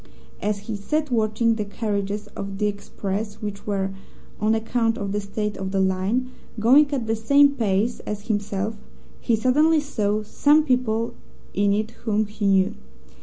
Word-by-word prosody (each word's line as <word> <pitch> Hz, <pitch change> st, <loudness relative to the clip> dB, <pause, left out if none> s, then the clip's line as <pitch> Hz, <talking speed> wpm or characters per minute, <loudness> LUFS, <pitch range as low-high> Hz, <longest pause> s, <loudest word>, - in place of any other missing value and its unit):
"As 210 Hz, 0 st, 0 dB
he 210 Hz, +1 st, -5 dB
sat 300 Hz, +8 st, -2 dB
watching 225 Hz, 0 st, +2 dB
the 220 Hz, -1 st, -2 dB
carriages 205 Hz, -1 st, -3 dB
of 195 Hz, 0 st, -6 dB
the 210 Hz, -, 0 dB
express 205 Hz, 0 st, -3 dB
which 210 Hz, -2 st, -7 dB
were 195 Hz, -2 st, -1 dB, 0.5 s
(on 215 Hz, +1 st, +2 dB
account 225 Hz, +1 st, 0 dB
of 200 Hz, -1 st, -3 dB
the 205 Hz, +1 st, -1 dB
state 210 Hz, +1 st, -3 dB
of 190 Hz, 0 st, -3 dB
the 195 Hz, 0 st, 0 dB
line) 190 Hz, +7 st, 0 dB, 0.3 s
going 275 Hz, +7 st, +5 dB
at 265 Hz, -5 st, -1 dB
the 225 Hz, 0 st, 0 dB
same 280 Hz, +6 st, +5 dB
pace 225 Hz, -2 st, 0 dB
as 210 Hz, 0 st, -6 dB
himself, 205 Hz, 0 st, -1 dB, 0.4 s
he 235 Hz, -, +1 dB
suddenly 300 Hz, +8 st, +3 dB
saw 215 Hz, -7 st, -1 dB
some 295 Hz, +8 st, +4 dB
people 245 Hz, -5 st, 0 dB, 0.4 s
in 200 Hz, 0 st, +2 dB
it 215 Hz, +2 st, 0 dB
whom 215 Hz, -2 st, -1 dB
he 210 Hz, 0 st, -3 dB
knew. 190 Hz, -1 st, +3 dB
215 Hz, 165 wpm, -24 LUFS, 200-235 Hz, 0.5 s, going